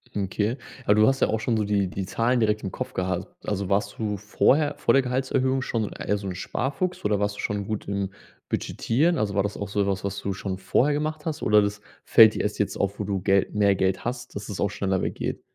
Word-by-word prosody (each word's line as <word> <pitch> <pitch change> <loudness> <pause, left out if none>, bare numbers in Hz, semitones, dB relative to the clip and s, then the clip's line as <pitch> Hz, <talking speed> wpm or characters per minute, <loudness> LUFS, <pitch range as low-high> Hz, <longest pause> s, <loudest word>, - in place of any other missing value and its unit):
Okay. 105 +5 -1 0.3
Aber 105 - +4
du 110 0 +5
hast 135 0 +2
ja - - +4
auch 110 - 0
schon 115 +1 0
so 110 - +1
die 100 -2 +1
die 95 +1 -4
Zahlen 120 +5 +1
direkt 105 -1 +1
im 95 - -3
Kopf - - -5
gehabt. 90 0 -2 0.2
Also 100 -2 -2
warst 100 +1 0
du 105 -2 -2
vorher 145 +8 +2
vor - - +2
der 135 - +5
Gehaltserhöhung 130 +1 0
schon 115 -5 -2
eher 105 - -1
so 100 -1 -6
'n 90 - -4
Sparfuchs 140 - -3
oder 105 -1 +2
warst 105 0 -1
du - - -11
schon 105 -1 -2
gut 110 0 -4
im 100 -1 -2 0.4
Budgetieren? 160 +9 +1
Also 100 -2 -1
war 100 - +3
das 100 - -3
auch 100 -1 -5
so 100 -1 0
was, 95 -1 -1
was 100 0 -3
du 100 - -2
schon 95 -1 -4
vorher 125 +9 +2
gemacht 155 +1 -2
hast 160 -1 -3
oder 105 0 +5
das 100 0 -2 0.2
fällt 110 -2 +7
dir - - -1
erst 105 +1 -2
jetzt 105 - 0
auf, 100 +1 -1
wo 105 - -2
du 95 -2 -2
Gel 95 0 +3
mehr 100 -1 +3
Geld 95 0 0
hast, 120 -2 -5
dass 100 +1 -6
es 100 - -5
auch 100 - +1
schneller 95 -2 -1
weggeht? - - -3
105 Hz, 245 wpm, -25 LUFS, 100-120 Hz, 0.4 s, fällt